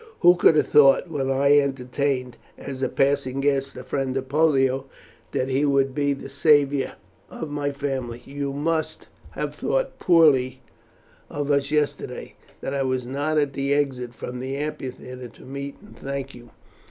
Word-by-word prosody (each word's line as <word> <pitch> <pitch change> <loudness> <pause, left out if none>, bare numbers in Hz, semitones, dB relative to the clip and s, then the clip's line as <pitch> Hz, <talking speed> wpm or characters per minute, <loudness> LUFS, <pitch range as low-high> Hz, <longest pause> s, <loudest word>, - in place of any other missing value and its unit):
Who 175 0 +7
could 165 - +5
have 150 - +4
thought, 145 +3 +5
when 135 -3 -1
I 140 +2 +5
entertained, 135 -1 -1 0.2
as 135 -1 -7
a 130 - +1
passing 135 -1 +1
guest, 135 -1 0
the 125 - -8
friend 135 -1 -2
of 130 0 -4
Pollio, 135 -3 +2 0.5
that 130 - -1
he 135 +2 +1
would 135 -2 +2
be 145 0 +1
the 135 - -8
saviour 140 -1 +3 0.4
of 155 -2 -6
my 145 -1 -1
family? 135 -4 -4
You 140 0 -4
must 155 +2 -2 0.2
have - - -3
thought - - -2
poorly 135 -7 +4 0.7
of 145 0 -2
us 140 -1 +1
yesterday 150 -1 -2 0.3
that 135 - -3
I 140 - 0
was 130 -2 -1
not 145 +5 -1
at 145 -2 +1
the 140 +1 0
exit 125 -4 -1
from 125 +1 -6
the 130 +2 -4
amphitheatre 130 -3 -6
to 115 - -17
meet 140 +1 -6
and 210 - -16
thank 135 0 -5
you. 120 -1 -13
140 Hz, 165 wpm, -24 LUFS, 130-145 Hz, 0.7 s, Who